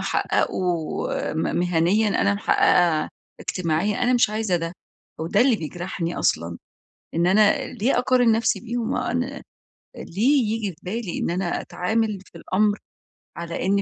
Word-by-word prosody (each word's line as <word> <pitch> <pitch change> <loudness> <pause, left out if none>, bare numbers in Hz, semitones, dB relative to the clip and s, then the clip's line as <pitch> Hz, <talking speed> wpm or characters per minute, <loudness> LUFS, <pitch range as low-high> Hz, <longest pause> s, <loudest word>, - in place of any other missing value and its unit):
حققوا 175 -4 -1
م 160 - -1
مهنيًا 175 +5 +2
أنا 200 0 +2
محققة 175 -5 +3 0.3
اجتماعيًا، 185 +4 -1
أنا 245 +1 +3
مش 240 -3 +3
عايزة 215 -4 0
ده، 165 0 -4 0.5
هو 160 - -2
ده - - +2
اللي 250 -3 +4
بيجرحني 170 +1 -4
أصلًا، 85 +1 0 0.6
إن 170 +2 +2
أنا 215 +7 +4
ليه 245 +2 0
أقارن 250 -2 +3
نفسي 225 +1 +1
بيهم؟ 240 +1 -2
أنا 255 +3 -2 0.5
ليه 250 - +1
ييجي 215 -3 -2
في 155 - -18
بالي 200 0 -4
إن - - -1
أنا 175 0 -1
أتعامل 215 +3 -1
في - - -14
الأمر 205 +2 +1 0.6
على 170 +1 -4
إن 200 +1 +2
200 Hz, 145 wpm, -23 LUFS, 175-225 Hz, 0.6 s, اللي